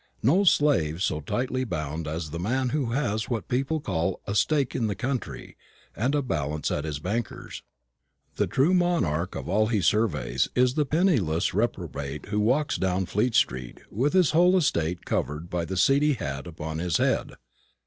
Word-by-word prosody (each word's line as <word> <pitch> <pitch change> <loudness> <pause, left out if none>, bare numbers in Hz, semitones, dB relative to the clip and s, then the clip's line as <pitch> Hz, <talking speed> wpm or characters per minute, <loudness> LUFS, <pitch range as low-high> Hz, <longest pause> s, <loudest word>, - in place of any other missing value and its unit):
No 170 - +4
slave 110 - +3
so 75 - 0
tightly 130 - -2
bound 80 - -4
as 80 0 -4
the 85 - -4
man 125 +7 0
who 145 -2 -1
has 110 -6 -1
what 115 -4 -3
people 135 +5 0
call 95 - -2
'a 100 - -3
stake 140 +4 +1
in 115 - 0
the 100 - -2
country' 130 +5 -4 0.4
and 125 +7 0
a 145 - +1
balance 75 - -2
at 75 - -2
his 75 -2 -3
banker's. 100 +9 -4 0.8
The - - +1
true 145 +8 +2
monarch 165 - +1
of - - -5
all 110 +2 +2
he 110 -2 +1
surveys 75 - +1
is 125 0 +3
the 150 0 0
penniless 130 - +1
reprobate 80 - -3
who 105 0 0
walks 130 +8 +1
down 95 0 0
Fleet 110 +6 0
street 65 -1 0
with 130 - 0
his 185 -5 +4
whole 180 +3 +5
estate 85 - 0
covered 75 +4 -2
by 85 -1 -1
the 95 +2 -4
seedy 140 +8 +4
hat 70 - -5
upon 80 -1 -5
his 85 -2 +1
head." - - 0
105 Hz, 175 wpm, -26 LUFS, -, 0.8 s, whole